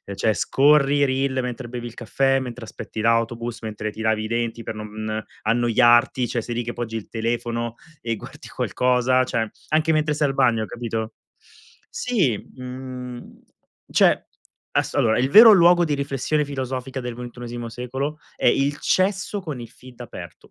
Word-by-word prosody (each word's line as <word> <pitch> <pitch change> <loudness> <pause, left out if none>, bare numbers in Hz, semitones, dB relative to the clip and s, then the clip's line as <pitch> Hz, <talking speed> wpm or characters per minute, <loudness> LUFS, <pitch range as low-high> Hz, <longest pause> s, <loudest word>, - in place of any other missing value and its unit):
Cioè 110 +3 +1
scorri, 145 +3 +4
reel 130 0 0
mentre 125 0 -5
bevi 120 0 -6
il 120 - -7
caffè, 135 +3 +1
mentre 125 -2 -6
aspetti 110 - -7
l'autobus, 115 +1 0
mentre 105 -1 -4
ti 110 - -8
lavi 110 -1 +1
i - - -3
denti 115 0 -2
per - - -5
non 110 0 -5 0.2
annoiarti, 120 +2 +4
cioè 120 - -2
sei 120 +1 -5
lì 120 - -1
che 120 +1 -5
poggi 115 -2 -5
il 110 - -5
telefono, 115 0 -2 0.3
e 115 -1 -2
guardi - - -11
qualcosa; 125 0 +1
cioè 115 -3 -1 0.2
anche 155 +1 +2
mentre 155 -1 +1
sei 150 0 +2
al - - -2
bagno, 120 -5 +2
capito? 115 -1 -4 0.8
Sì, 195 - 0 0.2
mhmm, 125 -1 -8 0.5
cioè - - +4 0.5
asso - - 0
allora, 110 -1 +3
il 130 +2 +1
vero 220 +7 +10
luogo 175 -2 +6
di 150 - -1
riflessione 140 +2 0
filosofica 130 -2 -4
del 125 -2 -5
ventunesimo 120 -1 -7
secolo, 130 +6 -4 0.2
è - - +1
il 140 +1 +2
cesso 190 +2 0
con 155 -9 -6
il 115 - -9
feed 125 0 -14
aperto. 120 - -10
125 Hz, 165 wpm, -23 LUFS, 115-135 Hz, 0.8 s, vero